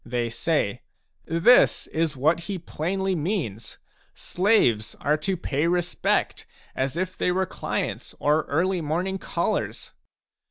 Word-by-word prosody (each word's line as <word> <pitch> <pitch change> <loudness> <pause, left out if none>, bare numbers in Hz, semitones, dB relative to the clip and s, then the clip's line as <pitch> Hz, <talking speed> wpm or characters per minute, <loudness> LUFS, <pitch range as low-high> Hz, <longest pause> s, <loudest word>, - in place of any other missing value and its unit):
They 120 -1 -2
say: 115 - -1 0.2
" - - -50
This 170 +10 +4
is 160 -3 -2
what 155 +6 +2
he 195 - -2
plainly 190 +3 -2
means: 150 - -3 0.4
slaves 175 - +2
are 150 +1 +2
to 185 +4 -2
pay 150 -2 -1
respect 175 0 0 0.3
as 135 +4 -1
if 185 +1 -2
they 180 - 0
were 190 +1 +1
clients - - -4
or 150 +1 +2
early 180 +5 0
morning 180 +5 -2
callers - - -2
165 Hz, 130 wpm, -25 LUFS, 145-185 Hz, 0.4 s, This